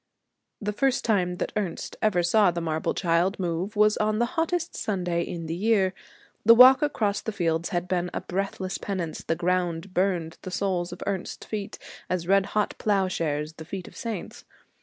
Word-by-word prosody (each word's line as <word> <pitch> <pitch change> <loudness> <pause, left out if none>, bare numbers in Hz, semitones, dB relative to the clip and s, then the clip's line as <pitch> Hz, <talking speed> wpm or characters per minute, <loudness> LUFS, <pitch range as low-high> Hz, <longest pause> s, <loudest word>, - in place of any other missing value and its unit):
The 210 -1 -2
first 270 +4 +1
time 185 -5 +1
that - - -2
Ernest 200 -6 -3
ever 190 -5 +2
saw 200 +3 +4
the 170 0 -2
marble 160 -1 -1
child 175 +2 +1
move 180 +3 -2
was 210 0 +4
on 215 0 +1
the 240 - +2
hottest 335 0 -1
Sunday 180 -4 -1
in 170 -1 -5
the 160 - -3
year. 195 0 +2 0.5
The 230 +2 +8
walk 255 +2 +9
across 220 -9 0
the 220 - -3
fields 165 -4 -1
had 175 0 -2
been 180 -1 0
a - - -3
breathless 190 0 -3
penance, 180 -5 -4
the 165 - 0
ground 180 +1 -1
burned 180 -4 0
the - - -6
soles 180 -2 -1
of - - -7
Ernest's 190 -2 -4
feet 210 -1 -5 0.3
as 180 -2 -2
red 195 0 +4
hot 210 - +1
ploughshares 165 -7 0
the 160 0 -10
feet 185 +1 -6
of - - -13
the - - -11
saints. 225 -7 -5
185 Hz, 185 wpm, -26 LUFS, 175-210 Hz, 0.5 s, walk